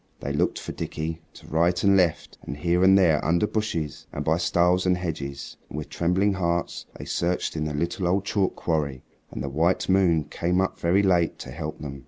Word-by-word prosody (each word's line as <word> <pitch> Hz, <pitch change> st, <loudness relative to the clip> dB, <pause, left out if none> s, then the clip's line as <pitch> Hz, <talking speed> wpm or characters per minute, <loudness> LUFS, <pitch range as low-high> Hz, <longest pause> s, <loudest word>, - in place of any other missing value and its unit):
They -, -, -4 dB
looked -, -, +1 dB
for -, -, -6 dB
Dickie 80 Hz, +1 st, -4 dB
to -, -, -14 dB
right 85 Hz, +3 st, +1 dB
and 100 Hz, -1 st, +5 dB
left 90 Hz, -4 st, +1 dB
and 70 Hz, -, -7 dB
here 85 Hz, +3 st, +1 dB
and 95 Hz, +1 st, +7 dB
there 85 Hz, -6 st, +3 dB
under 85 Hz, +5 st, +2 dB
bushes, 95 Hz, -10 st, -3 dB
and 75 Hz, -, -5 dB
by 80 Hz, +1 st, +2 dB
stiles 90 Hz, +1 st, +2 dB
and 90 Hz, 0 st, +3 dB
hedges, 70 Hz, -6 st, -5 dB
and -, -, -7 dB
with 75 Hz, -1 st, -5 dB
trembling 90 Hz, +6 st, +1 dB
hearts 85 Hz, -2 st, -2 dB
they -, -, -8 dB
searched 90 Hz, 0 st, -1 dB
in 75 Hz, -1 st, -1 dB
the 75 Hz, -, -3 dB
little 85 Hz, +4 st, -1 dB
old 95 Hz, +2 st, +1 dB
chalk 100 Hz, -2 st, 0 dB
quarry, 75 Hz, -6 st, -2 dB, 0.3 s
and 60 Hz, -, -6 dB
the -, -, -3 dB
white 80 Hz, +6 st, +1 dB
moon 90 Hz, -5 st, +3 dB
came 90 Hz, +4 st, -1 dB
up 95 Hz, -, -1 dB
very 90 Hz, +4 st, +3 dB
late 90 Hz, -4 st, +2 dB
to -, -, -8 dB
help 75 Hz, +2 st, -5 dB
them. 70 Hz, -2 st, -6 dB
85 Hz, 210 wpm, -25 LUFS, 75-90 Hz, 0.3 s, and